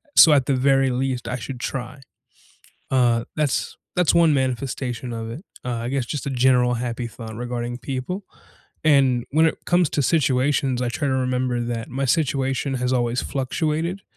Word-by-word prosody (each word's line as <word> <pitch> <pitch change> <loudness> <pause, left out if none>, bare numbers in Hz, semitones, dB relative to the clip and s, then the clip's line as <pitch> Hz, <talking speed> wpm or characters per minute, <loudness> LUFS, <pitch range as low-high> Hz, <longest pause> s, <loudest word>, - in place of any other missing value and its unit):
So, 155 - +9
at 135 -3 +3
the 135 - +2
very 135 0 +3
least, 125 0 -2
I 125 - -2
should 120 +2 -7
try. 135 +2 -5 0.9
Uh, 120 -2 +2
that's 150 -3 -1 0.2
that's 180 -2 +3
1 165 -3 +5
manifestation 130 -2 -2
of 115 0 -5
it. 145 - -7 0.2
I 120 -1 -2
guess 135 -3 -1
just 145 +2 -4
a - - 0
general 125 -1 +3
happy 120 0 -3
thought 110 -1 -9
regarding 120 0 -4
people. 135 +10 -4 0.6
And 135 -5 +4
when 160 +2 +4
it - - -4
comes 175 -3 +3
to 145 - +1
situations, 135 -3 +2
I 125 -1 -1
try 140 +5 -2
to 130 - +1
remember 125 -1 0
that 120 -1 -3
my 135 +2 -2
situation 135 -1 0
has 125 +1 0
always 120 0 +1
fluctuated. 160 +7 -2
130 Hz, 170 wpm, -23 LUFS, 120-140 Hz, 0.9 s, So